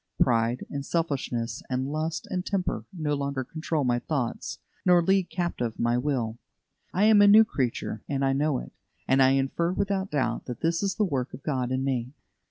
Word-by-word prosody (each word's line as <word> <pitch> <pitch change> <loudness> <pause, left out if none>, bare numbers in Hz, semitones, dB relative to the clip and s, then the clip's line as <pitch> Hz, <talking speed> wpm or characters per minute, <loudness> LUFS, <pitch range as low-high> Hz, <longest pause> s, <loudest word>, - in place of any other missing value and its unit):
Pride 115 +1 +2
and 140 -1 -3
selfishness, 140 -7 -2
and 130 0 -1
lust 155 +2 -3
and 180 -1 -1
temper, 190 -2 -2
no 155 -6 -2
longer 140 -2 -2
control 155 +2 -2
my 120 -1 +1
thoughts 130 -4 -3 0.3
nor 180 -1 +6
lead 190 0 +2
captive 145 -11 -2
my 120 0 +1
will. 120 -4 -1 0.5
I 190 - +1
am 215 -1 +7
a 205 - +7
new 215 +2 +8
creature, 130 - -2
and 135 -1 0
I 135 - +2
know 145 0 +1
it, - - -7 0.4
and 135 +1 +4
I 130 0 +6
infer 135 +6 0
without 195 0 -1
doubt 130 -5 -1
that 125 -2 -6
this 165 0 +1
is 200 -1 0
the 215 - +2
work 135 -7 -2
of 135 - -14
God 130 -5 -1
in 130 0 0
me. 130 -1 -2
140 Hz, 190 wpm, -27 LUFS, 125-175 Hz, 0.5 s, new